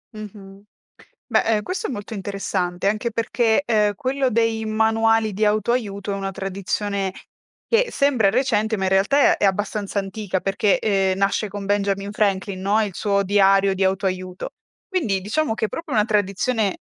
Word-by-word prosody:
Mh-mh. 200 -2 -10 0.6
Beh, - - +2
ehm, 220 -2 +1
questo 370 - -3
è - - -5
molto 205 -3 -7
interessante 195 -2 -2
anche 215 +3 -1
perché, 230 +2 +1
ehm, 210 -4 +2
quello 260 +4 -1
dei 225 0 +1
manuali 220 0 +2
di 210 +3 0
auto-aiuto 210 -2 0
è - - -1
una 195 0 -4
tradizione 195 0 -3 0.5
che 475 +1 +2
sembra 255 -8 +2
recente, 220 -3 +1
ma 190 - -2
in 190 - +1
realtà 280 - +4
è - - -1
abbastanza 200 +1 -1
antica 195 -1 -3
perché, 195 +1 +1
ehm, 195 -3 +1
nasce 200 +2 +1
con 200 0 -6
Benjamin 200 0 0
Franklin, 195 -2 -1
no, 205 +3 +2
il 200 - -5
suo 200 0 +1
diario 195 0 +3
di 190 - 0
auto-aiuto. 185 -1 -2 0.4
Quindi 280 - 0
diciamo 220 +6 -1
che - - -2
è - - -13
proprio 325 -4 -5
una 210 -2 +4
tradizione 210 0 0
205 Hz, 165 wpm, -22 LUFS, 195-225 Hz, 0.6 s, realtà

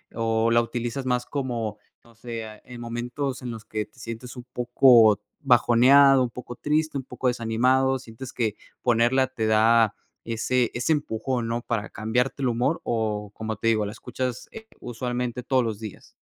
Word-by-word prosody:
o 115 0 +1
la 115 0 +4
utilizas 120 +2 -4
más 125 -1 0
como, 120 -6 -3 0.3
no 115 -1 -20
sé, 115 -1 -6
eh, 110 -1 -11
en 125 -1 -11
momentos 125 +3 -4
en 125 -1 -5
los 115 -1 -9
que 110 -1 -3
te 120 - -24
sientes 115 +3 -8
un 120 - -8
poco 120 -3 +5 0.2
bajoneado, 130 +1 +6
un 120 - -1
poco 120 0 -9
triste, 155 +1 0
un 130 - -4
poco 130 - -3
desanimado, 125 +3 +2
sientes 125 +2 -10
que 110 -4 -1 0.3
ponerla 125 +2 +3
te 120 -4 -3
da 110 0 +4 0.3
ese 120 +2 0
ese 125 +6 -1
empujón, 125 -4 -1
¿no? 115 +1 -2
Para 115 -3 -2
cambiarte 125 +5 -1
el 130 - +2
humor 125 +7 0
o, 105 -3 -2
como 110 0 -4
te 115 - -3
digo, 110 -2 +2
la 100 - -4
escuchas, 125 +1 -5
eh, 220 0 -11
usualmente 125 +1 -3
todos 130 0 +2
los 110 -2 -3
días? 110 -3 -9
120 Hz, 180 wpm, -25 LUFS, 115-130 Hz, 0.3 s, bajoneado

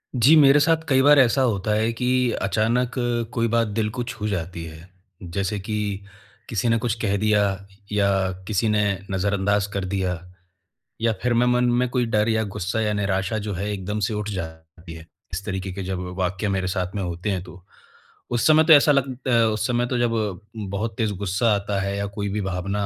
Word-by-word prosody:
जी, 130 +6 +6
मेरे 145 -1 +7
साथ 160 +2 +3
कई 135 -2 +4
बार 145 +1 +6
ऐसा 130 +1 +4
होता 105 -4 +1
है 110 +2 +1
कि 125 +1 +1
अचानक 115 +5 +1 0.4
कोई 115 -1 +1
बात 115 0 +1
दिल 105 +1 -1
को 125 - -1
छू 115 -3 -5
जाती 90 -3 -4
है। 80 +2 -11 0.3
जैसे 95 +4 -3
कि, 105 0 -3 0.5
किसी 115 +1 0
ने 115 - +3
कुछ 115 -1 -1
कह 100 -3 +1
दिया 105 0 +2 0.5
या 105 -1 +2 0.4
किसी 110 +1 +1
ने 105 0 +2 0.3
नज़रअंदाज़ 100 +1 0
कर 100 -1 -2
दिया, 95 -2 -1 0.8
या 115 -1 +2
फिर 125 -1 +2
मैं 120 +1 +3
मन 125 0 +3 0.2
में 125 - +2
कोई 125 -1 0
डर 110 -1 +1
या 110 0 +1
गुस्सा 100 +5 -2
या 105 -1 0
निराशा 100 0 -1
जो 105 - -2
है, 100 +3 -3
एकदम 105 +1 -3
से - - -3
उठ 105 0 -3
जाती 80 -2 -8
है, 80 -1 -11 0.3
इस 95 +3 -4
तरीक़े 95 -1 -4
के 100 +1 -5
जब 90 -1 -4
वाक़ये 95 +3 -1
मेरे 95 -1 -1
साथ 95 -1 -3
में 100 - -2
होते 90 +3 -4
हैं 95 -2 -2
तो। 90 -1 -13 0.7
उस 120 -1 +2
समय 155 0 +6
तो 160 0 +7
ऐसा 145 0 +6
लग 140 -2 +1
अ, - - +1
उस 110 -2 +2
समय 120 -1 +1
तो 125 - -1
जब, 110 -5 -1 0.2
बहुत 105 +1 -4
तेज़ 110 -3 0
गुस्सा 100 +4 +1
आता 100 0 -2
है 100 0 -2
या 100 - -2
कोई 100 -1 -2
भी 105 +2 -2
भावना 100 +2 -2
105 Hz, 205 wpm, -23 LUFS, 95-115 Hz, 0.8 s, मेरे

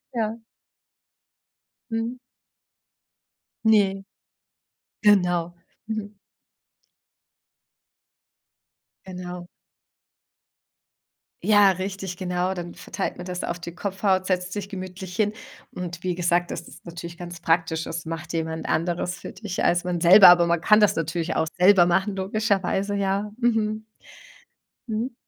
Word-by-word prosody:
Ja. 225 -1 -2 1.5
Mhm. 225 +2 -2 1.5
Ne. 200 -3 +3 1.0
Genau. 180 -5 +3 0.3
Mhm. 215 -1 -5 2.9
Genau. 180 -1 -7 2.0
Ja, 205 -2 +6
richtig 190 0 -4
genau. 180 0 -1
Dann 175 -1 -6
verteilt - - -5
man 180 - -7
das 180 -1 -4
auf 170 0 -3
die 170 0 -8
Kopfhaut, 190 -1 0
setzt 180 -1 -1
sich 200 -1 -5
gemütlich 185 -1 -7
hin. 210 +2 +1 0.4
Und 175 -1 -6
wie 180 -1 -2
gesagt, 175 0 +1
das 170 - -4
ist - - -16
natürlich 170 0 -8
ganz 175 -1 -8
praktisch. 165 -1 +1
Es 165 0 -5
macht 165 +1 -6
jemand 160 -1 -3
Anderes 175 +2 -1
für - - -8
dich 205 -4 -5
als 175 0 +2
man 180 -1 -2
selber, 185 +2 +9
aber 175 -1 +6
man 170 -1 +1
kann 210 0 +5
das 210 - +4
natürlich 165 +1 -2
auch 160 - +1
selber 185 -1 +7
machen 190 +3 +1
logischerweise, 200 0 0
ja. 200 +1 -1
Mhm. 220 -2 0 1.0
Mhm. 230 +3 -2
185 Hz, 115 wpm, -24 LUFS, 175-205 Hz, 2.9 s, selber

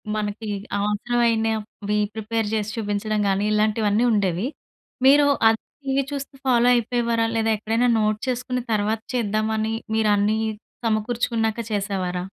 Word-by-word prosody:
మనకి 210 +1 -3 0.3
అవసరమైనవి 220 -1 0 0.2
ప్రిపేర్ 220 0 -2
చేసి 215 -1 -1
చూపించడం 210 0 -1
కానీ, 195 +2 +1
ఇలాంటివన్నీ 215 +1 +2
ఉండేవి. 200 +1 +1 0.6
మీరు 285 +1 +6 0.2
ఆ - - +7 0.3
టీవీ 270 0 +1
చూస్తూ 275 -1 -5
ఫాలో 240 -1 +4
అయిపోయేవారా, 235 -1 +1
లేదా 225 0 +1
ఎక్కడైనా 225 +3 +1
నోట్ 215 0 +1
చేసుకొని 250 0 -2
తర్వాత 215 +1 0
చేద్దామని 220 0 0 0.2
మీరు 215 -1 +3
అన్నీ 210 +2 +2 0.5
సమకూర్చుకున్నాక 225 0 0
చేసేవారా? 190 -3 -2
220 Hz, 115 wpm, -23 LUFS, 210-235 Hz, 0.6 s, ఆ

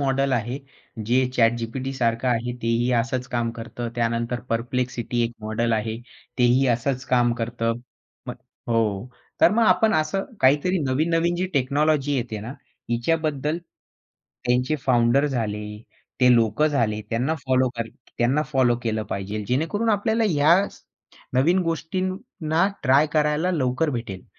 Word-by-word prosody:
Model 135 0 +1
आहे 120 +2 -1 0.5
जे 125 +2 +4 0.2
ChatGPTसारखं 120 +1 0
आहे 120 0 0
तेही 115 +2 +1
असच 125 +2 -3
काम 115 -1 0
करतं. 120 +1 -5
त्यानंतर 115 +1 -1
Perplexity 120 0 -1
एक 115 - -3
मॉडेल 110 +2 -1
आहे. 110 0 -1 0.4
तेही 125 +2 +4
असंच 130 +2 -2
काम 120 -1 +4
करतं. 115 0 -2 0.5
मग - - -4 0.3
हो. 115 -1 0 0.3
तर - - +7
मग 230 +2 +3
आपण 215 +3 +4
असं 155 +5 0 0.2
काहीतरी 150 +8 +3
नवीन-नवीन 165 +5 +1
जी 185 +1 -1
टेक्नॉलॉजी 145 +2 +1
येते 110 -4 -3
ना, 115 - -7 0.4
हिच्याबद्दल 150 +4 0 0.9
त्यांचे 125 +5 +1
फाउंडर 125 +3 +3
झाले, 105 -5 -3 0.4
ते 125 0 +6
लोकं 115 +6 +3
झाले, 115 -8 0
त्यांना 125 +8 0
फॉलो 130 0 +3
कर 115 -1 -3 0.3
त्यांना 130 +6 +2
फॉलो 130 -5 +2
केलं 110 -2 -1
पाहिजेल. 100 +2 -4
जेणेकरून 165 - 0
आपल्याला 220 +2 +1
ह्या 170 +5 +4
स - - -18 0.5
नवीन 165 +9 +3
गोष्टींना 175 +1 -1 0.2
ट्राय 140 +4 +4
करायला 150 +3 +1
लवकर 150 -1 0
भेटेल. 115 -7 -5
130 Hz, 135 wpm, -23 LUFS, 115-155 Hz, 0.9 s, तर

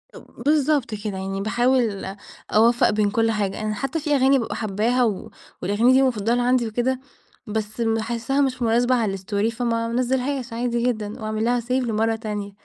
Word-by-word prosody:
اب - - -13
بالضبط 295 -5 +2
كده 205 -2 -5
يعني 195 +1 -4
باحاول 225 -3 0 0.4
أوفّق 235 +3 +4
بين 210 -1 +1
كل 225 +1 +2
حاجة 205 -1 -2
أنا 215 0 -1
حتى 275 +8 -2
في 295 -1 0
أغاني 270 0 +4
بابقى 230 - -4
حاباها، 220 +4 0
و 210 -5 -2 0.3
والأغاني 215 +6 +3
دي 265 - +5
مفضلة 240 -2 +1
عندي 245 -1 +2
وكده، 245 +4 -1 0.5
بس 215 +2 -3
باحسها 230 +4 0
مش 255 -2 0
مناسبة 240 +2 +3
على 210 -5 0
الStory 205 +3 -1
فما 230 -1 -1
انزلهاش 255 +1 -1
عادي 235 0 -1
جدًا، 215 -4 -2
وأعمل 215 0 -2
لها 245 0 +2
Save 240 +2 -8
لمرّة 225 -3 +1
تانية. 210 -2 -5
230 Hz, 170 wpm, -23 LUFS, 215-250 Hz, 0.5 s, دي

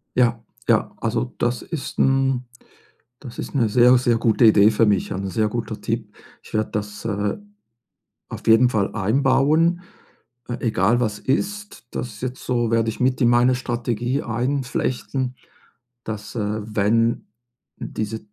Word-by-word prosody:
Ja, 120 -2 +2 0.3
ja, - - +2
also, 115 +2 -1
das 120 0 -1
ist 160 -5 -6
'n 135 -1 +2 0.8
das 125 -4 -10
ist - - -6
'ne 120 -5 +2
sehr, 125 +3 +6
sehr 120 -2 +2
gute 115 +1 +2
Idee 105 0 +6
für 115 +2 +3
mich, 100 -3 +1
ein 95 +1 -3
sehr 105 +3 0
guter 110 -1 -4
Tipp. 110 -2 -3 0.3
Ich - - -16
werde 110 0 0
das, 105 0 -5
äh, 105 - -2 0.9
auf - - -9
jeden 115 +3 +6
Fall 110 -4 -1
einbauen, 135 - +2 0.7
äh, 120 - -4
egal 115 +1 +2
was 105 -3 -1
ist, 205 - -3
das 110 -4 -5
jetzt 130 0 -5
so 120 -2 0
werde 115 -1 +2
ich - - -10
mit 130 +2 +1
in 120 - +5
meine 120 +1 +4
Strategie 120 +1 -2
einflechten, 125 +1 -2 0.7
dass, 105 0 -6
äh, 105 0 -2
wenn 110 +2 +1 0.5
dieser 110 +1 -4
120 Hz, 145 wpm, -22 LUFS, 110-125 Hz, 0.9 s, sehr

